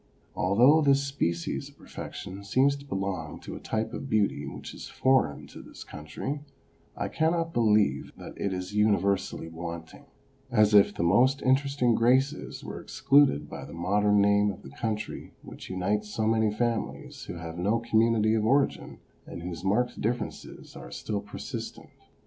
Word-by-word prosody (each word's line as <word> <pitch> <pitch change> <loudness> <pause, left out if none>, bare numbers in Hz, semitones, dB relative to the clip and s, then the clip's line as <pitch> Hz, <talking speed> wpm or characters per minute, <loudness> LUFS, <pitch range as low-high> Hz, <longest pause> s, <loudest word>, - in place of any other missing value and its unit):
Although 125 +12 +5
this 140 -1 +4
species 85 -12 -2
of - - -21
perfection 95 +2 -8
seems 130 +7 +3
to 140 0 -11
belong 95 - -3
to - - -7
a - - -7
type 110 0 -3
of 135 - -6
beauty 105 -2 +1
which - - -8
is - - -8
foreign 130 - +1
to - - -11
this - - -11
country, 75 - -6 0.6
I - - -2
cannot 165 +1 0
believe 110 -3 +2
that - - -9
it 100 - -2
is 90 +1 -4
universally 100 -4 +1
wanting, 85 0 -8 0.4
as 105 -3 +4
if 100 -1 +7
the - - -1
most 125 +11 +3
interesting 135 -2 +2
graces 130 +6 +1
were - - -7
excluded 140 - +3
by - - -8
the 70 +2 -10
modern 105 +4 +2
name 100 0 +4
of 100 - -7
the 65 - -11
country 110 - -4
which - - -10
unites 100 +3 -1
so 110 +1 -1
many 110 -1 +2
families 115 +1 -3
who - - -6
have 85 0 -7
no 100 +6 +2
community 115 -1 +2
of 110 -1 +1
origin, 135 +5 +1 0.3
and 85 - -8
whose 90 -1 -6
marked 110 +6 0
difi"erences 120 +2 -4
are - - -9
still 100 - -4
persistent. 105 0 -7
105 Hz, 160 wpm, -28 LUFS, 95-125 Hz, 0.6 s, if